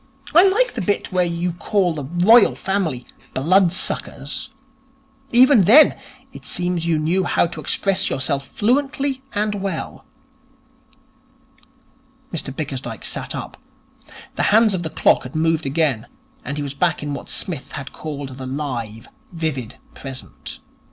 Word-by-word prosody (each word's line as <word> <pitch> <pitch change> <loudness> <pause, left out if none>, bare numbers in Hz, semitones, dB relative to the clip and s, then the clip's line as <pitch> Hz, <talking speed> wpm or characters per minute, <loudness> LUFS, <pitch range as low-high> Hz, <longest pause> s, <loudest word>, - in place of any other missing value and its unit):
I 340 +3 +8
like 460 +6 +2
the 230 - -3
bit 200 +3 -1
where 185 -1 +2
you 170 +1 -2
call 180 0 0
the 145 -3 -5 0.2
Royal 230 +1 +7
Family 180 -11 -2 0.3
"blood 175 +6 +4
suckers". 145 -5 -3 0.8
Even 245 -4 +6
then, 265 - +7 0.4
it - - -11
seems 175 -2 -1
you 165 -2 +2
knew 170 +5 +1
how 175 - +2
to 165 -2 -6
express 195 +6 0
yourself 135 +1 -2
fluently 270 +3 0
and 210 +1 0
well.' 195 -5 -4 2.3
Mr 150 -4 -3
Bickersdyke 135 -2 -5
sat - - -3
up. - - -7 0.8
The - - +1
hands 215 0 +5
of 185 - -1
the 160 - -3
clock - - +3
had 125 - -10
moved 160 -1 +1
again, 140 -6 0 0.4
and 140 - -5
he 145 - -2
was 140 -1 -4
back 165 +1 0
in 145 -1 -3
what 140 - -7
Psmith 155 -8 -3
had 140 -1 -7
called 145 -3 -6
the 130 - -5
live, 125 -6 -4 0.2
vivid 155 -9 -4 0.2
present. 135 -1 -8
165 Hz, 145 wpm, -21 LUFS, 140-200 Hz, 2.3 s, I